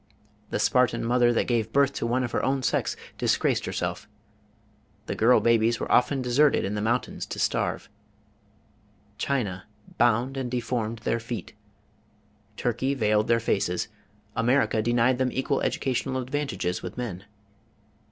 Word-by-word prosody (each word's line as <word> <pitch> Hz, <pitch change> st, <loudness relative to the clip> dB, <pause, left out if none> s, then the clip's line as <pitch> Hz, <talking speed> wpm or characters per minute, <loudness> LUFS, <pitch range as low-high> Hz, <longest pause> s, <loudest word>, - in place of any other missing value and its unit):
The -, -, -1 dB
Spartan 125 Hz, -2 st, +2 dB
mother 120 Hz, 0 st, +3 dB
that 120 Hz, -, +1 dB
gave 115 Hz, -3 st, 0 dB
birth 140 Hz, +1 st, +3 dB
to 115 Hz, -, -2 dB
one 125 Hz, +2 st, +1 dB
of 120 Hz, -, -3 dB
her -, -, -1 dB
own 135 Hz, 0 st, 0 dB
sex -, -, 0 dB, 0.2 s
disgraced -, -, +1 dB
herself; -, -, -3 dB, 1.0 s
the -, -, -3 dB
girl 120 Hz, +3 st, +4 dB
babies 115 Hz, 0 st, +3 dB
were -, -, -4 dB
often 130 Hz, +2 st, +3 dB
deserted 135 Hz, +4 st, +3 dB
in 100 Hz, -, -2 dB
the 105 Hz, -, -2 dB
mountains 120 Hz, +4 st, -1 dB
to -, -, -6 dB
starve; -, -, -1 dB, 1.3 s
China 105 Hz, -10 st, -2 dB, 0.3 s
bound 120 Hz, +3 st, +2 dB
and 130 Hz, -2 st, -2 dB
deformed 115 Hz, -2 st, -2 dB
their 115 Hz, -, 0 dB
feet; 115 Hz, -4 st, -6 dB, 1.0 s
Turkey 125 Hz, +3 st, -1 dB
veiled 105 Hz, -3 st, +2 dB
their 115 Hz, 0 st, +3 dB
faces; 95 Hz, -5 st, -1 dB, 0.5 s
America 120 Hz, -1 st, +2 dB
denied 120 Hz, +2 st, +2 dB
them 130 Hz, -1 st, +1 dB
equal 135 Hz, +1 st, -1 dB
educational 130 Hz, 0 st, -1 dB
advantages 125 Hz, -9 st, -2 dB
with -, -, -7 dB
men. 100 Hz, -7 st, -5 dB
120 Hz, 140 wpm, -26 LUFS, 115-130 Hz, 1.3 s, girl